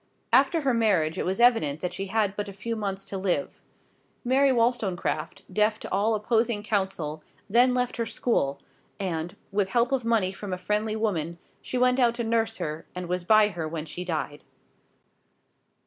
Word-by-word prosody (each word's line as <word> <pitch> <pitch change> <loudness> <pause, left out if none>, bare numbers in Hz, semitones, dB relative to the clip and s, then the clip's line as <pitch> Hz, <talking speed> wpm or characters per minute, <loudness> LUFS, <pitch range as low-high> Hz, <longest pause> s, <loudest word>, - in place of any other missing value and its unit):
After 275 +6 +4
her 270 -3 +1
marriage 195 -9 +2
it - - -1
was 190 +3 -1
evident 225 - +4
that 180 - -2
she 195 - -4
had 205 -1 0
but 205 0 -3
a - - -8
few 230 +4 -4
months 195 -2 -3
to 195 - -5
live; 195 +8 -1 0.6
Mary 270 +2 +4
Wollstonecraft, 230 -7 0
deaf 210 +2 +2
to - - -8
all 210 +4 +2
opposing 220 0 0
counsel, 190 -7 -2 0.3
then 245 +4 +4
left 250 0 -1
her 230 -1 -1
school, 140 - 0 0.4
and, 175 -3 -3 0.2
with 200 -1 +1
help 240 +4 +2
of 265 -3 +1
money 225 -5 +2
from 195 0 -6
a - - -2
friendly 210 +4 -1
woman, 170 -7 -1 0.2
she 255 - -3
went 250 +1 +3
out 235 -2 +3
to 235 - -2
nurse 225 0 0
her, 155 +1 -5
and 180 -1 -5
was 180 0 -2
by 215 +2 +5
her 170 -5 -4
when 155 -1 -4
she 175 +3 -6
died. 155 -4 -4
210 Hz, 180 wpm, -26 LUFS, 180-235 Hz, 0.6 s, by